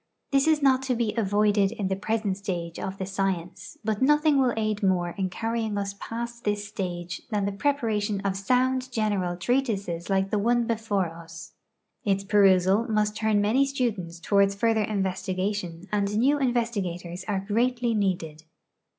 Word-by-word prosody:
This 275 +1 +3
is 310 -2 +3
not 265 -1 +4
to 250 - +2
be 230 -2 0
avoided 205 -2 +2
in 215 -4 -3
the 190 - 0
present 210 0 -1
stage 175 -4 -4
of 190 0 -4
the 190 - -3
science, 190 - -3
but 215 0 -1
nothing 295 +1 +4
will 255 -2 +3
aid 215 -1 -1
more 180 -3 +1
in 190 +1 -2
carrying 225 +2 -2
us 200 0 -2
past 235 +1 -6
this 205 0 -1
stage 180 -3 -5
than 205 -3 0
the 200 - -1
preparation 215 -4 0
of 195 -1 -1
sound 255 +5 +1
general 205 -6 0
treatises 200 -6 -1
like 195 0 +1
the 210 - +1
one 235 +2 +2
l)efore 205 -7 -1
us. 170 0 -11 0.5
Its 195 -1 +1
periLsal 195 +2 +4
must 210 -1 +1
turn 220 -2 +2
many 225 +7 +3
students 225 -11 -2
toward 200 +3 +3
further 225 +1 +2
investigation, 190 -2 -2
and 205 0 0
new 280 +6 +3
investigators 200 -9 -2
are 195 -2 -2
greatly 240 +2 +1
needed. 175 -7 -1
205 Hz, 160 wpm, -26 LUFS, 190-230 Hz, 0.5 s, not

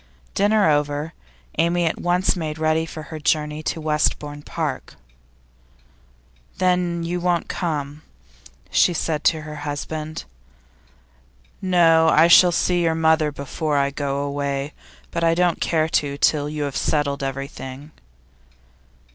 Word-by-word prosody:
Dinner 205 -1 +3
over, 145 +1 0 0.5
Amy 170 +1 +2
at 165 - -2
once 180 +2 +1
made 155 -3 -4
ready 160 +1 +1
for 155 -1 -8
her 155 - -5
journey 150 0 0
to 160 - -3
Westbourne 150 -1 -1
Park. 150 -2 -4 1.6
'Then 180 -2 +1
you 175 +1 -2
won't 175 -1 0
come?' 150 -4 -3 0.7
she 175 - +3
said 155 -2 -2
to 160 -2 +3
her 150 0 -8
husband. 150 +2 -5 1.4
'No. 165 -4 +4
I 160 +2 +6
shall 175 +1 +7
see 175 +1 +1
your 165 -1 +1
mother 160 -1 +2
before 145 +2 -3
I 140 0 +1
go 140 0 -2
away, 140 0 -3 0.4
but 170 - -2
I 165 0 +3
don't 175 -1 +1
care 160 -2 +1
to 140 -3 0
till 145 0 +2
you 150 -1 -3
have 140 -2 -4
settled 145 -2 0
everything. 135 +1 -6
155 Hz, 130 wpm, -22 LUFS, 145-170 Hz, 1.6 s, shall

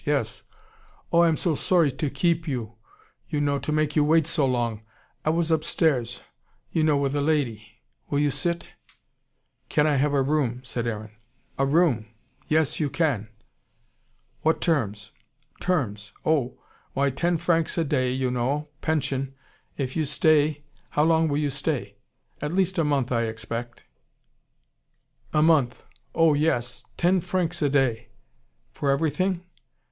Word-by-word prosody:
Yes! - - -1 0.7
Oh, 170 - +5
I 170 - +6
am 160 -2 +2
so 170 -4 +1
sorry 165 0 +2
to 140 +3 -2
keep 165 +4 0
you, 120 -6 -3 0.6
you 150 - -1
know, 145 -1 +1
to 155 - -3
make 155 -1 +1
you 150 - +4
wait 160 +1 +4
so 155 -3 +1
long. 120 -4 -1 0.4
I - - +1
was 165 +1 +1
upstairs, 150 -6 +1 0.5
you 160 - +1
know, 155 -2 +3
with 140 0 0
a 145 - +1
lady. 120 -8 -1 0.3
Will 145 - 0
you 145 0 +2
sit?" 170 +4 -2 1.0
"Can 150 - +3
I 150 -2 +3
have 145 +2 +2
a 135 - +3
room?" 130 -4 0
said 120 -2 -3
Aaron. 110 -2 -4 0.5
"A 135 - +3
room! 140 -8 +2 0.4
Yes, 155 -1 +1
you 150 -3 +1
can." 140 -8 0 1.1
"What 160 +1 +2
terms?" 110 - -1 0.5
"Terms! 105 - -1
Oh! 135 -5 +1 0.4
Why, 140 0 +1
ten 170 +6 0
francs 165 0 +1
a 165 - +3
day, 130 -4 +1
you 130 0 -1
know, 135 +5 -1
pension 135 -4 -1 0.4
if 130 -2 -3
you 155 - +1
stay 150 0 +2 0.3
How 150 - +2
long 160 0 +3
will 145 -1 0
you 145 -1 0
stay?" 135 -8 -3 0.4
"At 150 +2 -2
least 190 -1 +1
a - - +3
month, 140 -4 0
I 115 -1 +1
expect." 115 +2 -5 1.5
"A 150 - +3
month! 145 -7 +3 0.3
Oh 165 -2 +5
yes. 125 -5 0
Yes, - - -35
ten 180 +2 +3
francs 180 -1 -2
a 145 - +3
day." 135 -5 +1 0.6
"For 140 - -2
everything?" 165 +6 +1
145 Hz, 155 wpm, -25 LUFS, 125-160 Hz, 1.5 s, I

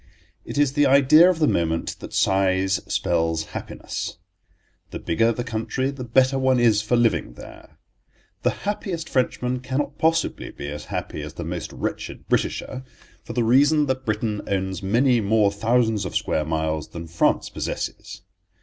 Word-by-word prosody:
It - - -6
is 145 -2 +3
the 145 -1 +4
idea 140 +6 +7
of 185 - +1
the 155 -2 +2
moment 80 -1 0
that - - -9
size 95 0 +2
spells 80 -2 0
happiness. - - -5 0.7
The - - -6
bigger 115 +8 +1
the 120 +1 -3
country 115 +3 -2
the 135 -2 -7
better 130 +3 +3
one 130 -1 +3
is 110 -3 +4
for 110 +3 0
living 115 - +1
there. - - -13 0.6
The - - +2 0.2
happiest 190 -5 -3
Frenchman 125 -1 0
cannot 135 +3 -3
possibly 165 +1 +1
be 70 - -7
as 75 +1 -7
happy 75 - -5
as 75 0 -8
the - - -5
most - - -5
wretched - - -5
Britisher, 130 - -1 0.4
for - - -7
the 120 - +1
reason 145 +6 +4
that 130 -1 -2
Britain 105 -1 -1
owns 95 -1 -2
many 120 +5 +3
more 105 0 +3
thousands 110 0 +1
of 95 - -5
square 75 - 0
miles 80 -1 -2
than 85 0 -8
France 85 0 +1
possesses. - - -5
115 Hz, 160 wpm, -23 LUFS, 95-130 Hz, 0.7 s, idea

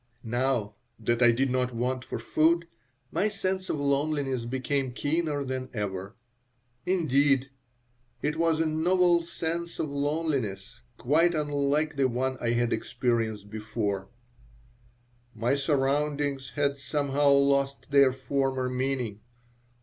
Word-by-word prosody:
Now 120 -2 0 0.2
that 120 0 0
I 120 -1 +7
did 130 +3 +1
not 125 -1 0
want 125 +2 -1
for - - -5
food, 170 +2 +2 0.5
my 210 - +1
sense 190 -2 -2
of 150 - -1
loneliness 140 -3 0
became 130 +1 -1
keener 145 +1 -1
than 130 -1 -4
ever. 100 -2 -4 0.7
Indeed, 140 -6 +2 0.7
it 150 - 0
was 165 -1 +2
a 165 - +2
novel 175 +2 +3
sense 170 0 -4
of 150 - -2
loneliness, 140 -9 -2 0.2
quite 165 +6 +3
unlike 145 0 0
the 135 -1 +3
one 130 +2 -1
I 120 - 0
had 120 0 +1
experienced 110 -4 -1
before 105 -3 -3 1.3
My 115 +4 +1
surroundings 140 -1 0
had 140 -1 0
somehow 145 0 +1
lost 140 0 +2
their 140 -2 +6
former 130 0 -1
meaning. 125 -5 -2
140 Hz, 120 wpm, -28 LUFS, 125-150 Hz, 1.3 s, I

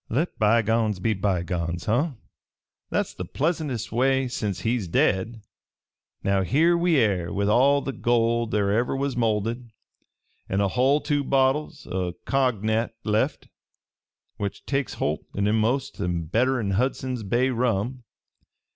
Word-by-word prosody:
"Let 155 +9 -1
bygones 110 -1 +2
be 110 +4 +1
bygones, 85 -3 -2
huh? 140 +8 +1 0.8
That's - - -1
the - - -6
pleasantest 150 - -2
way, 130 +3 +2
sence 100 -6 -3
he's 115 -2 -1
dead. 100 +6 0 0.8
"Now 100 0 +2
here 155 - +3
we 170 -2 +2
air, 95 -8 +1
with 100 0 0
all 135 +6 +4
the 135 - -2
gold 115 0 +1
there 100 -2 +1
ever 120 +5 +1
was 135 -1 -1
molded, 115 +1 -1 0.8
an' 95 - 0
a 100 -1 +2
hull 135 +7 +2
two 145 -2 0
bottles 140 +3 +1
o' 90 -1 -3
coggnac 115 -4 0
left, 105 0 0 0.9
which 100 -1 -5
takes 140 -1 -1
holt 75 +2 -2
e'enamost 110 +6 +1 0.3
better'n 120 -2 +1
Hundson's 130 0 -1
Bay 120 +6 +1
rum. 120 +1 -1
115 Hz, 130 wpm, -25 LUFS, 105-130 Hz, 0.9 s, all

